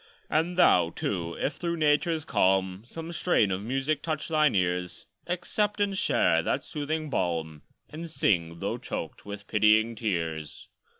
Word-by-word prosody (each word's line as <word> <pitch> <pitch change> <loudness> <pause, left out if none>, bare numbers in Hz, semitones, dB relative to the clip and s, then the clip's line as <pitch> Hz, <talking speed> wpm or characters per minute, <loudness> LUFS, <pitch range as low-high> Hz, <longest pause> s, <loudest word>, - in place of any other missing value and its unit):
And 170 +3 +1
thou, 90 - +5
too: 85 -1 -3
if 145 +1 -2
through 170 -1 -2
Nature's 155 +1 +2
calm 95 -2 +1
Some 165 +4 -7
strain 170 - +2
of 95 +2 -2
music 135 +5 -1
touch 155 -1 -3
thine 155 -5 +3
ears, 90 -1 -1 0.2
Accept 205 +4 -1
and 200 -1 +1
share 80 - +3
that 130 +10 -1
soothing 155 0 -3
balm, 80 - -2 0.3
And 165 +2 -7
sing, 85 - 0
though - - -2
choked - - -6
with 100 0 -7
pitying 110 +2 +3
tears. 85 -9 -3
115 Hz, 145 wpm, -28 LUFS, -, 0.3 s, thou